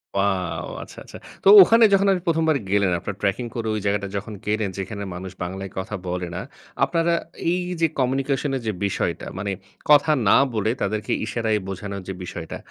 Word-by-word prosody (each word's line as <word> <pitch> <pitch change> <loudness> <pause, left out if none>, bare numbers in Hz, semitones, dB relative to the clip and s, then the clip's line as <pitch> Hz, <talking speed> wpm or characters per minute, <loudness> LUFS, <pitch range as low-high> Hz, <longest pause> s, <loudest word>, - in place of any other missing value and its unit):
Wow! 95 -3 -1
আচ্ছা, - - -14
আচ্ছা। - - -10 0.3
তো - - +1
ওখানে 230 +5 +6
যখন 195 +1 +4
আপনি 185 -2 0
১ম 165 -1 +2
বার 150 - +3
গেলেন 100 -2 +3
আপনারা 95 +1 -6
ট্র্যাকিং 100 +5 0
করে 115 -1 -3
ওই 105 - -1
জায়গাটা 100 0 0
যখন 105 +2 -6
গেলেন। 105 -1 0
যেখানে 100 +1 -5
মানুষ 95 +1 -7
বাংলায় 95 +1 -5
কথা 95 +3 -3
বলে 90 0 -2
না, 90 - -3 0.4
আপনারা 165 +4 +2 0.4
এই 180 - 0 0.2
যে 165 - +5
কমিউনিকেশন 135 +2 0
এর 130 - -3
যে 110 - 0
বিষয়টা। 100 - -2
মানে 100 0 -2 0.4
কথা 150 +1 +6 0.2
না - - +7 0.2
বলে 110 0 +1
তাদেরকে 105 +1 -2
ইশারায় 110 -1 0
বোঝানোর 100 +1 -5
যে 95 - -3
বিষয়টা, 85 -2 -6
105 Hz, 185 wpm, -23 LUFS, 95-135 Hz, 0.4 s, না